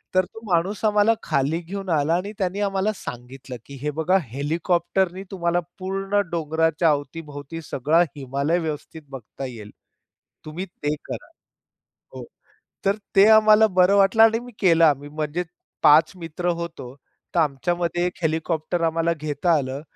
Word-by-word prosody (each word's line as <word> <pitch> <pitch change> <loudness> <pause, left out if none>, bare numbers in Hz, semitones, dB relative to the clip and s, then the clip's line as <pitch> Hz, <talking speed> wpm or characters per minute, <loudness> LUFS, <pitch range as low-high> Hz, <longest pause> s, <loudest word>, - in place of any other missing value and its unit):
तर 185 0 +4
तो 225 - -13
माणूस 180 +6 0
आम्हाला 210 +1 +4
खाली 140 +4 0
घेऊन 195 +3 -6
आला 155 -1 +2
आणि 190 +4 -3
त्यांनी 190 +1 -2
आम्हाला 195 +1 0
सांगितलं, 125 -2 -9
की 140 - -11
"हे 150 +1 -1
बघा 185 +4 +3
हेलिकॉप्टरनी 170 - -1
तुम्हाला 175 -2 0 0.2
पूर्ण 195 +2 -1
डोंगराच्या 160 0 +1
अवतीभोवती 145 +1 -4
सगळा 150 +4 +1
हिमालय 140 +4 -1
व्यवस्थित 160 0 -6
बघता 135 0 -8
येईल. 110 -5 -9 0.7
तुम्ही 160 +5 -5
ते 150 -5 -4
करा." - - -7 0.9
हो, - - -7 0.6
तर 195 - +3 0.2
ते 195 +1 +7
आम्हाला 220 0 +6
बरं 185 +2 +5
वाटलं 200 +3 +5
आणि 225 0 +4
मी 245 +1 -11
केला 165 -4 +5
आम्ही 145 +1 -7
म्हणजे 155 +3 -3 0.4
5 155 +1 +6
मित्र 170 +1 -5
होतो. 135 -7 -7 0.4
तर - - +4
आमच्यामध्ये 175 +4 0
1 180 - -7
हेलिकॉप्टर 160 +1 -1
आम्हाला 165 +1 +1
घेता 150 +3 0
आलं 135 0 -4
165 Hz, 145 wpm, -23 LUFS, 145-185 Hz, 0.9 s, ते